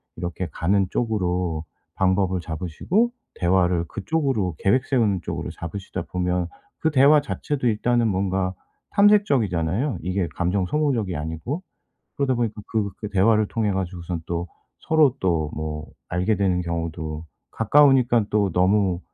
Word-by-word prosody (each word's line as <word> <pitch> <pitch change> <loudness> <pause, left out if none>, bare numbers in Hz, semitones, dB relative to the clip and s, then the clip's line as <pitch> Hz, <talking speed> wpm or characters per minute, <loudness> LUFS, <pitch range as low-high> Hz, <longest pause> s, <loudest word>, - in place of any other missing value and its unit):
이렇게 85 +1 -4
가는 95 +3 +1
쪽으로 90 -8 -1 0.3
방법을 95 0 +1
잡으시고 90 - -1 0.2
대화를 90 -1 +2
그쪽으로 115 - -1
계획 125 +7 +2
세우는 110 -9 +2
쪽으로 - - -4
잡으시다 90 +4 -6
보면 90 -1 -1 0.3
그 160 - +1
대화 145 +2 +6
자체도 145 -2 -2
일단은 120 +1 +2
뭔가 95 -1 0 0.4
탐색적이잖아요 135 - +2
이게 90 +1 -1
감정 90 +2 0
소모적이 125 - 0
아니고. 80 - -4 0.6
그러다 140 -2 +1
보니까 115 -3 -2
그 110 -3 -1
그 105 - -5
대화를 105 +2 +3
통해가지고선 90 -6 -2
또 85 +1 -3 0.3
서로 155 -5 +3
또 80 -5 0
뭐 75 0 -4 0.2
알게 90 +4 +1
되는 95 -2 +1
경우도 80 -2 -4 0.3
가까우니까 125 -2 +4
또 105 -2 +1
너무 95 0 +2
95 Hz, 320 characters per minute, -23 LUFS, 90-120 Hz, 0.6 s, 대화